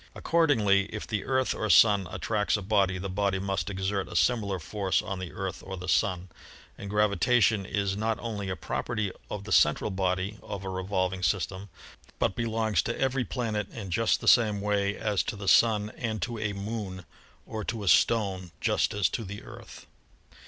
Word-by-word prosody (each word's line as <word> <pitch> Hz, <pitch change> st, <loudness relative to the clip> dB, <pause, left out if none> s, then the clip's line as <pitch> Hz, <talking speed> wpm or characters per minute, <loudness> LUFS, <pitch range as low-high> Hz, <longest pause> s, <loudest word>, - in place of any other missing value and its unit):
Accordingly, 110 Hz, -13 st, +3 dB
if 105 Hz, +1 st, -6 dB
the 110 Hz, -3 st, -3 dB
Earth 130 Hz, 0 st, +1 dB
or 110 Hz, -, -3 dB
Sun 100 Hz, -3 st, +6 dB
attracts 105 Hz, -1 st, 0 dB
a 100 Hz, -, -6 dB
body, 95 Hz, -2 st, +2 dB
the 95 Hz, +2 st, -4 dB
body 100 Hz, 0 st, 0 dB
must 95 Hz, +1 st, -2 dB
exert 95 Hz, 0 st, -2 dB
a -, -, -9 dB
similar 105 Hz, -6 st, +2 dB
force 95 Hz, +3 st, -1 dB
on 95 Hz, -3 st, -4 dB
the 95 Hz, -2 st, -6 dB
Earth 95 Hz, -1 st, -5 dB
or 95 Hz, -1 st, -6 dB
the 90 Hz, +1 st, -7 dB
Sun, 95 Hz, -2 st, +1 dB, 0.5 s
and 100 Hz, -, -8 dB
gravitation 105 Hz, 0 st, +2 dB
is 100 Hz, -2 st, -1 dB
not 110 Hz, +2 st, -1 dB
only 105 Hz, -5 st, -4 dB
a 95 Hz, -, -2 dB
property 105 Hz, 0 st, -3 dB, 0.2 s
of 105 Hz, -1 st, -5 dB
the 110 Hz, -, -8 dB
central 75 Hz, +7 st, +3 dB
body 95 Hz, +2 st, -1 dB
of 100 Hz, -2 st, -6 dB
a -, -, -3 dB
revolving 95 Hz, -1 st, -2 dB
system, 95 Hz, +1 st, -1 dB, 0.5 s
but 95 Hz, -, 0 dB
belongs 110 Hz, -5 st, 0 dB
to 120 Hz, -, -4 dB
every 135 Hz, -1 st, +1 dB
planet 110 Hz, -3 st, -3 dB
in 100 Hz, -5 st, -7 dB
just 115 Hz, +6 st, +2 dB
the -, -, -6 dB
same 110 Hz, -4 st, +5 dB
way 100 Hz, 0 st, 0 dB
as 105 Hz, -3 st, 0 dB
to 135 Hz, -, -4 dB
the 100 Hz, -1 st, -7 dB
Sun 105 Hz, -1 st, +4 dB
and 110 Hz, -2 st, -4 dB
to 120 Hz, -2 st, -4 dB
a 105 Hz, -1 st, -2 dB
Moon 100 Hz, -3 st, -5 dB, 0.4 s
or 110 Hz, -1 st, -5 dB
to 110 Hz, 0 st, -4 dB
a -, -, -5 dB
stone 95 Hz, -3 st, +3 dB
just -, -, +1 dB
as 105 Hz, -4 st, +3 dB
to 115 Hz, -, -3 dB
the 100 Hz, +1 st, -8 dB
Earth. -, -, -12 dB
100 Hz, 190 wpm, -28 LUFS, 95-110 Hz, 0.5 s, Sun